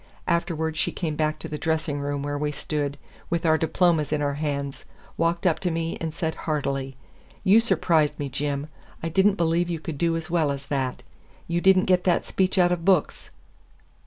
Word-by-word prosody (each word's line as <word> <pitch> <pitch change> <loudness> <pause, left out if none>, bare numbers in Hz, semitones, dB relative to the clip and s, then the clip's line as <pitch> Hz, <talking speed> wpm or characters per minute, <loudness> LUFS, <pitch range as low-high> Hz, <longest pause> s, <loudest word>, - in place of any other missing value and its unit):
Afterward 165 -2 -1
she - - +1
came 160 -3 -3
back 155 0 0
to - - -7
the 150 - -5
dressing 155 -2 -1
room 145 0 -2
where 145 0 -2
we 150 +1 -1
stood, 145 0 -3 0.3
with 170 0 -1
our 160 -1 +5
diplomas 160 -2 +2
in 150 - +1
our 145 -1 0
hands, 140 -1 -3 0.3
walked 165 +1 0
up 170 -3 +3
to 180 - -1
me, 165 0 -2
and 165 -1 -2
said 160 0 -2
heartily: 135 -4 -2 0.5
"You 200 +4 +6
surprised 165 -9 +2
me, 145 - -3
Jim. 140 +1 -2 0.4
I 165 - -1
did 190 +4 +4
n't 205 -1 +2
believe 170 +1 +1
you 170 -2 -2
could 155 -2 -6
do 165 -1 +2
as 165 0 -6
well 165 -4 +2
as 140 0 -4
that. 130 -2 -2 0.4
You 170 +1 0
did 190 +1 +6
n't 185 - +3
get 180 -1 +3
that 180 - +2
speech 190 +1 0
out 175 -1 +5
of 175 -2 -1
books." 185 -4 +1
160 Hz, 205 wpm, -25 LUFS, 145-170 Hz, 0.5 s, You